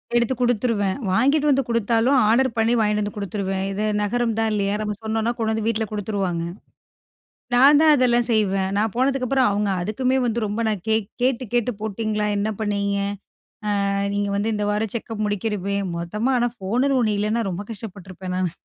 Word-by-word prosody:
எடுத்து 240 +1 +2
குடுத்துருவேன். 230 -5 +1
வாங்கிட்டு 280 +9 +3
வந்து 275 -1 +3
குடுத்தாலும் 230 +3 +2
ஆர்டர் 260 +4 +4
பண்ணி 225 +1 +3
வாங்கிட்டு 210 -1 +1
வந்து 205 - -5
குடுத்துருவேன். 195 -1 -2
இது 210 +2 -2 0.2
நகரம் 230 +2 0
தான் 225 0 +1
இல்லையா, 200 -1 0
நம்ம 210 -1 -2
சொன்னோன்னா 220 +1 0
கொண்டு 225 -2 0
வந்து 220 -1 -2
வீட்ல 220 -1 0
குடுத்துருவாங்க. 195 -5 -2 1.1
நான் 280 +4 +7
தான் 310 -1 +6
அதெல்லாம் 240 -2 +3
செய்வேன். 195 -3 +1
நான் 215 0 0
போனதுக்கப்புறம் 260 -1 +2
அவங்க. 205 0 0
அதுக்குமே 255 +7 0
வந்து 235 0 0
ரொம்ப 210 +3 -2
நான் 210 -5 -1
கே 220 - +3 0.3
கேட்டு 255 0 +1
கேட்டு, 240 0 +1
போட்டீங்களா? 215 0 -2
என்ன 210 +2 0
பண்ணீங்க? 200 -1 0 0.9
ஆ - - 0 0.2
நீங்க 205 0 -1
வந்து 215 +2 0
இந்த 210 0 -1
வாரம் 210 0 -1
செக்கப் 225 -1 -4
முடிக்கிறமே. 205 -1 -2 0.2
மொத்தமா 210 +10 -1
ஆனா 240 0 +1
ஃபோன்னுன்னு 250 +8 +1
ஒன்னு 215 -3 +1
இல்லைன்னா, 215 +3 0
ரொம்ப 185 +3 -4
கஷ்டப்பட்டுருப்பேன் 190 -3 -7
நானு. 185 -2 0
220 Hz, 165 wpm, -22 LUFS, 200-240 Hz, 1.1 s, நான்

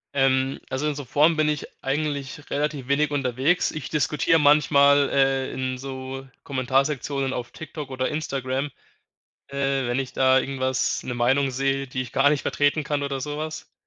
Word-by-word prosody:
Ähm, 135 0 +2
also, 130 +3 -1
in 150 - -1
so 145 - -5
Foren 150 +6 +3
bin 155 -1 +2
ich 150 -2 -2 0.2
eigentlich 145 0 -3
relativ 145 -2 -2
wenig 145 +2 +2
unterwegs. 140 +5 +1
Ich 155 - -6
diskutiere 150 +2 +2
manchmal, 145 -1 +5
äh, 135 -1 +2
in 130 -1 -3
so 135 0 -6 0.2
Kommentarsektionen 135 +1 0
auf 120 -1 -5
Tik-Tok 155 -3 -8
oder 130 -1 -1
Instagram, 135 -2 -2 0.8
äh, 140 -1 -1
wenn 120 +1 0
ich 135 -1 -3
da 130 0 +4
irgendwas 130 -1 -1
'ne 125 - -3
Meinung 135 +3 +2
sehe, 135 +1 -1
die 130 0 -3
ich 125 -1 -10
gar 135 +1 +4
nicht 145 -1 +1
vertreten 145 +1 +1
kann 145 0 -1
oder 140 -1 -2
so 150 +1 -4
was, 155 0 -6
135 Hz, 170 wpm, -24 LUFS, 130-145 Hz, 0.8 s, manchmal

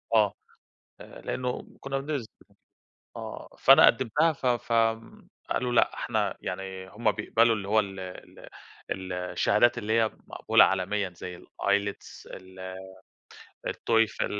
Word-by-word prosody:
آه، 105 -3 +4 0.7
آآ - - -12
لإنه 125 -1 -3
كنا 135 0 -3
بنز 140 -4 -3 0.9
آه، - - -7
فأنا - - +8
قدِّمتها 150 +7 +3
ف 135 - -6
ف 120 -1 0
آمم 115 0 0 0.2
قالوا 125 -1 0
لأ - - +3
إحنا - - -1
يعني 95 +1 -6
هُم 110 +2 +1
بيقبلوا 115 +2 +2
اللي 100 -1 -6
هو 110 +1 +4
ال 95 -2 -6
ال 90 -1 -10 0.5
ال 95 -1 -4
الشهادات 105 +6 +2
اللي 110 -1 -2
هي 110 -1 +2 0.2
مقبولة - - +4
عالميًا 95 +1 0
زي 90 0 -7
الIELTS 100 0 -2
ال 95 0 -9 0.9
الTOEFL 115 -1 +1
105 Hz, 130 wpm, -27 LUFS, 95-120 Hz, 0.9 s, فأنا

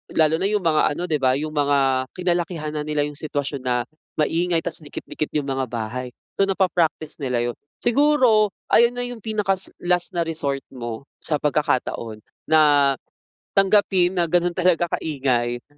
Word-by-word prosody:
lalo 160 0 +3
na 195 - +1
yung 210 -2 0
mga 155 -2 +2
ano 175 - -4
'di 160 -4 0
ba, 130 -1 +3
yung 155 +2 -3
mga 140 -3 +2
kinalakihan 175 -3 -1
na 155 - -3
nila 150 -1 0
yung 145 0 -5
sitwasyon 145 -2 -3
na 125 -1 0 0.3
maingay 165 +2 +1
tapos 165 - -2
dikit-dikit 155 0 -6
yung 145 -2 -1
mga 135 -1 -1
bahay. 120 +2 -5 0.2
So, 195 - +4
napa-practice 170 -5 0
nila 125 -4 -1
'yon. - - -15 0.3
Siguro, 240 -6 +4 0.2
ayun 235 +1 +5
na 245 - -2
yung 245 -1 -6
pinakasa 200 -3 -1 0.2
last 175 0 0
na 170 - +2
resort 145 -4 -3
mo 120 -2 -6 0.2
sa 150 - -1
pagkakataon 140 -7 -1 0.2
na 145 -3 +5 0.6
tanggapin 190 -2 +3
na 170 - +3
ganun 175 +1 +2
talaga 175 -1 +1
kaingay, 120 -5 -1
155 Hz, 160 wpm, -22 LUFS, 140-180 Hz, 0.6 s, ayun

